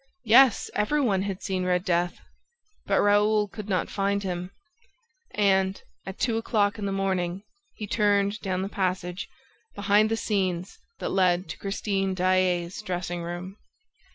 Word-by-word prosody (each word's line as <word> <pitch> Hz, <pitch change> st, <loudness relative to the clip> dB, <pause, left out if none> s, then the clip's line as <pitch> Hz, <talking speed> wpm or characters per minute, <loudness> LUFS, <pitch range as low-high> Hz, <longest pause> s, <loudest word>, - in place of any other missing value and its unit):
Yes, 240 Hz, +1 st, +5 dB
every 210 Hz, +9 st, +1 dB
one 205 Hz, -9 st, +2 dB
had 195 Hz, -1 st, -4 dB
seen 190 Hz, -2 st, -1 dB
Red 180 Hz, 0 st, 0 dB
Death; 175 Hz, -1 st, 0 dB, 0.7 s
but -, -, +2 dB
Raoul 210 Hz, +1 st, +3 dB
could 210 Hz, +1 st, -9 dB
not 185 Hz, -, 0 dB
find 200 Hz, 0 st, -1 dB
him; 180 Hz, -1 st, -4 dB, 0.9 s
and, 190 Hz, -2 st, +2 dB, 0.3 s
at 190 Hz, -, -6 dB
two 230 Hz, -3 st, 0 dB
o'clock 210 Hz, -2 st, 0 dB
in 200 Hz, -, -2 dB
the -, -, -2 dB
morning, 190 Hz, -1 st, -1 dB, 0.3 s
he 210 Hz, -, -5 dB
turned 205 Hz, -1 st, +1 dB
down 185 Hz, -2 st, -2 dB
the -, -, -2 dB
passage, 185 Hz, -2 st, -2 dB, 0.5 s
behind 205 Hz, +1 st, +3 dB
the 225 Hz, -, 0 dB
scenes, 185 Hz, -5 st, -2 dB, 0.2 s
that -, -, -3 dB
led 185 Hz, -1 st, +2 dB
to -, -, -7 dB
Christine 195 Hz, -1 st, -1 dB
Daae's 185 Hz, -1 st, +1 dB
dressing 175 Hz, -3 st, -4 dB
room. 175 Hz, +3 st, -6 dB
195 Hz, 150 wpm, -26 LUFS, 185-205 Hz, 0.9 s, Yes